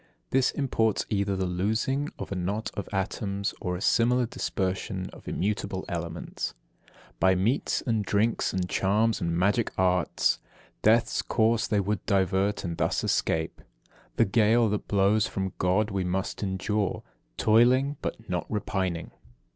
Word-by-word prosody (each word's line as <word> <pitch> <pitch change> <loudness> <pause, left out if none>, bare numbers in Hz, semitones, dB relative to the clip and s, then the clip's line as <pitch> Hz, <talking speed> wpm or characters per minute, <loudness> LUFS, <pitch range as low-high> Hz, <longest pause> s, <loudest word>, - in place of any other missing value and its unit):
This 130 -1 +3
imports 115 -6 0
either 100 -1 +1
the 95 0 -1
loosing 110 +11 0
of - - -7
a - - -1
knot 100 +4 -2
of 100 - -5
atoms, 100 0 -2
or 90 -1 -2
a 90 - -6
similar 125 +3 +3
dispersion 95 -3 -3
of - - -15
immutable 100 -1 -2
elements. 85 -2 -4 0.3
51. - - -27 0.3
By 95 0 +4
meats 110 +9 0
and 115 -3 +1
drinks, 105 +4 +1
and 95 -1 -1
charms 105 +4 +1
and 85 0 0
magic 100 +6 +2
arts 90 -3 +2 0.4
Death's 115 +2 +3
course 115 0 +1
they 105 - +1
would 100 +1 -1
divert, 95 +1 +1
and 85 -3 -4
thus - - 0
escape........ 80 0 0 0.5
The 115 - +4
gale 110 +2 +3
that 105 0 -2
blows 100 +1 +3
from 95 -1 -3
God 95 +4 +2
we 95 -1 -1
must 90 +1 -2
endure, 100 0 -1 0.3
Toiling, 130 +6 +4
but 110 - -5
not 90 -2 -3
repining..... 95 -5 -2
100 Hz, 145 wpm, -27 LUFS, 95-110 Hz, 0.5 s, By